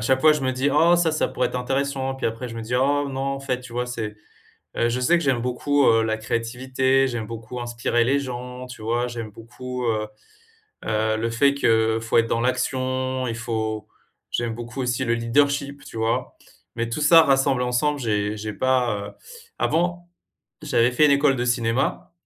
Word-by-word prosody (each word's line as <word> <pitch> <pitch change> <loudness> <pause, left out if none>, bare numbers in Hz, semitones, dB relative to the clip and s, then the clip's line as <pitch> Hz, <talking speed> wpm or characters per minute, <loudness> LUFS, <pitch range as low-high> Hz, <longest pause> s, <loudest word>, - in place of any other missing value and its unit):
chaque 130 +4 +2
fois 155 -1 +7
je 150 - -1
me 130 - 0
dis: 130 +2 0
«Oh, 170 +4 +5
ça, 165 -2 +2
ça 155 - 0
pourrait 125 -1 -1
être - - -5
intéressant.» 135 +1 -1
puis - - -7
après, 115 +2 -4
je 115 - -8
me 115 - -5
dis: 120 +3 -4
«Oh 140 +3 +2
non, 135 0 -4
en 135 0 -2
fait», 125 -2 -2
tu 120 -1 -11
vois? 125 0 0
C'est 110 -4 -5 0.6
heu 120 0 +1
je 125 +2 -1
sais 150 +8 +3
que 170 - -3
j'aime 130 -4 +1
beaucoup, 135 +3 +1
heu, 115 0 +5
la 110 0 -1
créativité, 130 +4 0
j'aime 115 -4 -4
beaucoup 115 +2 -7
inspirer 120 0 0
les 135 +4 +2
gens, 125 -1 -6
tu 125 -3 -11
vois? 120 +2 0
J'aime 115 -2 -6
beaucoup, 125 +3 -7
heu, 110 -2 0 0.8
heu, 110 0 0
le 115 +1 -2
fait, 140 +4 +3
qu'il 110 -4 +2
faut 115 +1 +2
être 115 - +3
dans 115 - 0
l'action, 130 0 -1
il 115 - -2
faut 110 -1 -3 0.4
j'aime 120 -1 -2
beaucoup 120 +3 -6
aussi 125 0 -1
le 115 - +2
leadership, 140 +4 0
tu - - -10
vois? 110 +1 -1 0.4
Mais, 115 0 -3
tout 120 - -3
ça 165 +2 +7
rassemble 135 -2 +2
ensemble, 135 +4 0
j'ai 105 -3 -1
j'ai 105 0 -5
pas, 120 -4 0
heu - - -11 0.5
avant 175 +2 0 0.5
j'avais 120 +1 +2
fait 150 +4 +4
une 140 - +4
école 140 -1 +3
de 120 - -1
cinéma 120 +6 0
125 Hz, 200 wpm, -23 LUFS, 115-135 Hz, 0.8 s, fois